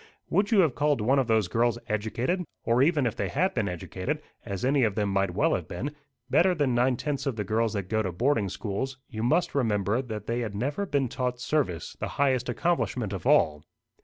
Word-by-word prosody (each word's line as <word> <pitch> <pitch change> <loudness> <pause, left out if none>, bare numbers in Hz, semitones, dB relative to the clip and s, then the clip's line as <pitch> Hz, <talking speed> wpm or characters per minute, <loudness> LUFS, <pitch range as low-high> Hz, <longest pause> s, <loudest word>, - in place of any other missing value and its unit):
"Would 200 +1 +2
you 215 -4 +5
have 160 -7 +2
called 145 -1 +1
one 130 +6 +3
of 130 - +1
those 110 -4 +2
girls 115 +4 +1
educated? 115 - -1 0.2
Or 120 +2 +2
even 145 -1 +3
if 115 - -1
they 100 - -1
had 185 +7 +1
been 105 -5 0
educated, 95 - -4 0.2
as 100 0 -4
any 135 0 +3
of 105 -4 +1
them 105 -2 0
might 95 -2 0
well 160 +9 +3
have 85 -3 -2
been, 135 +14 -5 0.3
better 180 +6 +4
than 145 -5 +1
nine 125 +1 +2
tenths 145 0 -2
of 135 - -1
the 105 - -2
girls 110 +2 0
that 100 -2 -1
go 110 +4 0
to 95 -3 -2
boarding 110 - +1
schools, 120 +8 -4
you 110 - -4
must 125 +9 +2
remember 110 -3 +1
that 110 -5 -6
they 115 +2 -1
had 110 -4 -3
never 145 - -2
been 140 -6 +1
taught 125 0 -2
service 125 - -1
the - - -2
highest 130 -3 +2
accomplishment 125 - 0
of 95 -4 -4
all. 75 -1 +4
120 Hz, 220 wpm, -27 LUFS, 105-140 Hz, 0.3 s, you